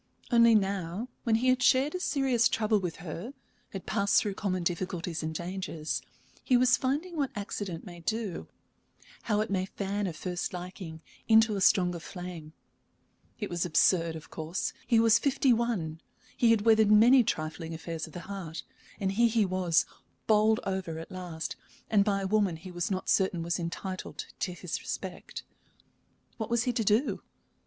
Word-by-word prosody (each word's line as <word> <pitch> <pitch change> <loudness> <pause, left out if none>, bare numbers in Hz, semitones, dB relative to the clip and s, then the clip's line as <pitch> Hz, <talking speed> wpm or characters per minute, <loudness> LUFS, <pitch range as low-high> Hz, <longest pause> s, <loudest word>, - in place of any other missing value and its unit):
Only 235 -1 +6
now, 195 +2 -1 0.2
when 225 -2 +3
he 250 +3 +2
had 255 0 +3
shared 265 +3 +4
a 365 - -2
serious 265 -8 +2
trouble 215 -1 +2
with 180 -4 -3
her, 180 - -6 0.3
had 195 - -7
passed 200 0 +3
through 205 - -2
common 185 -2 -2
difficulties 175 -1 -2
and 160 0 -3
dangers, 170 -3 -3 0.4
he 255 - +4
was 255 +1 +5
finding 295 +7 -2
what 280 -4 0
accident 200 -4 -5
may 175 -3 -10
do 215 +1 -3 0.8
how 210 -1 +3
it 215 - -3
may 190 -1 0
fan 200 +1 -2
a 175 - -4
first 180 +3 -4
liking 180 -2 -7 0.3
into 220 -1 +5
a 195 - -2
stronger 180 -2 +3
flame. 175 -3 -8 0.9
It 205 -4 -4
was 175 -1 0
absurd, 165 0 +3
of 155 - -10
course. 160 +3 -3
He 235 -2 +4
was 225 0 +5
fifty 275 -2 +3
one, 195 -10 -1 0.3
he 235 - +3
had 225 -2 +4
weathered 220 -1 +5
many 240 +5 +7
trifling 160 -4 -3
affairs 165 0 -5
of 160 - -14
the 175 - -6
heart, 175 -5 -6 0.4
and 190 -1 0
here 235 +4 +3
he 220 -2 +2
was, 180 -3 +2 0.4
bowled 215 0 +4
over 190 -4 -3
at 165 - -8
last, 175 -3 -5 0.4
and 205 -2 +5
by 200 -1 0
a - - -1
woman 200 -4 +2
he 175 +3 -10
was 175 -1 -2
not 185 -2 -3
certain 190 -3 +2
was 170 +2 -1
entitled 185 +2 -5
to 180 - -2
his 175 -1 -5
respect. - - -6 0.9
What 220 - -4
was 235 -1 +2
he 245 - 0
to 230 -1 0
do? 215 +7 +2
195 Hz, 175 wpm, -29 LUFS, 175-225 Hz, 0.9 s, many